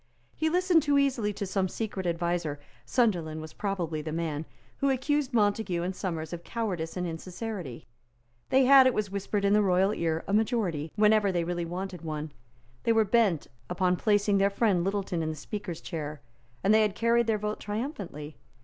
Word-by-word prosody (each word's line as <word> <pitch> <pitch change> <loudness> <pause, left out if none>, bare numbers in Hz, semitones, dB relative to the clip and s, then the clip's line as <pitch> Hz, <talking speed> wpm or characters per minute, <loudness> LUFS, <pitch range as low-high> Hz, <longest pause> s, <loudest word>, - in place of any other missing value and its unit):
He 315 +1 +1
listened 360 -1 +3
too 290 -1 +2
easily 260 -7 +2
to 200 0 -4
some 190 0 0
secret 195 -2 -4
adviser, 170 -3 -1 0.3
Sunderland 170 - +1
was 155 0 -8
probably 175 -6 -2
the 155 +1 -5
man, 160 -1 -3 0.3
who 275 - +2
accused 280 +1 0
Montague 205 -6 +1
and 185 +1 -3
Somers 165 -4 -4
of 175 0 -6
cowardice 185 -8 -3
and 180 - -1
insincerity. 175 - -6 0.6
They 265 0 +4
had, 270 0 +8
it 255 - +1
was 205 -2 -1
whispered 200 +1 -1
in 200 - +4
the 210 - +5
royal 190 +1 +3
ear, 165 -3 -1
a 195 - -2
majority, 205 -9 0
whenever 210 -1 +4
they 175 -2 0
really 175 0 -2
wanted 180 +1 -5
one. 155 -2 -4 0.5
They 230 - +1
were 220 -1 +4
bent 205 -7 +2 0.2
upon 180 -1 +1
placing 205 0 +2
their 200 0 +4
friend 200 -4 +2
Littleton 195 -3 -1
in 160 - -1
the 155 - -3
Speaker's 180 +2 -6
chair; 150 -3 -5 0.4
and 205 - +4
they 220 - +6
had 210 -2 +1
carried 235 +1 +2
their 220 -1 +2
point 210 +1 -3
triumphantly. 205 - -5
195 Hz, 185 wpm, -28 LUFS, 170-220 Hz, 0.6 s, had